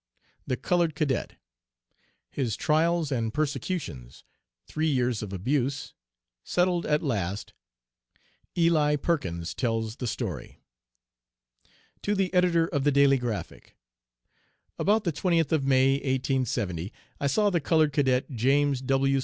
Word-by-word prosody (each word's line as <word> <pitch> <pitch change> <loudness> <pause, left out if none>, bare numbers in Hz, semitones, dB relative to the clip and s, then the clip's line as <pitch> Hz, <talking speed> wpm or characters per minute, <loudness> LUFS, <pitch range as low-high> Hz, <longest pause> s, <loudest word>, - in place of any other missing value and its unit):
THE 125 - -1
COLORED 170 +2 +1
CADET. 140 -5 -1 1.0
HIS 120 -7 -1
TRIALS 160 0 +1
AND 115 -4 -1
PERSECUTIONS 140 - -3 0.4
THREE 155 +1 -1
YEARS 125 -6 +1
OF 105 -3 -6
ABUSE 135 +7 -1 0.5
SETTLED 180 -1 +1
AT 150 +1 +1
LAST 100 - -2 1.0
"ELI 160 -3 +3
PERKINS" 90 - -2
TELLS 115 -2 -2
THE 125 - -4
STORY. - - -5 1.4
To 205 - 0
the 190 -2 0
Editor 175 -2 +3
of 145 -7 -1
the 145 - +3
Daily 140 -1 +4
Graphic: 120 -4 -5 1.0
About 210 +2 +2
the 170 - -1
20th 165 -1 +1
of 155 -4 +1
May, 130 0 +4
1870, 130 - -1 0.3
I 140 - 0
saw 205 +9 +2
the 170 -3 +1
colored 155 -1 +2
Cadet, 135 -2 +1
James 135 +2 +2
W. 135 +1 +2
140 Hz, 120 wpm, -27 LUFS, 125-160 Hz, 1.4 s, Daily